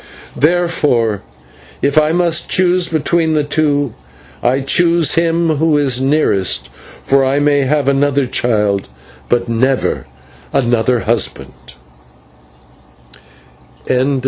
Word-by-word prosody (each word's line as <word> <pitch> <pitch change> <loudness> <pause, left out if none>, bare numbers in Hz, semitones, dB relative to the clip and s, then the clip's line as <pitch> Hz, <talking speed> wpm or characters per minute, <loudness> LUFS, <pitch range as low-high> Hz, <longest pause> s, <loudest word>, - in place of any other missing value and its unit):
Therefore, 150 - 0 0.6
if 140 0 +1
I 155 0 +3
must 170 -1 0
choose 180 -1 +2
between 160 0 0
the 150 -1 +1
two, 145 -3 -1 0.5
I 130 +2 +1
choose 170 +3 +2
him 165 -1 +1
who 160 0 +2
is 135 -3 +1
nearest; 100 - 0 0.3
for 135 0 +2
I 135 +1 0
may 145 -1 +2
have 145 0 0
another 140 0 +1
child, 105 -5 0 0.4
but 120 0 0
never 125 +3 -1 0.4
another 120 -1 +1
husband." 65 - -3
145 Hz, 100 wpm, -15 LUFS, 120-160 Hz, 0.6 s, I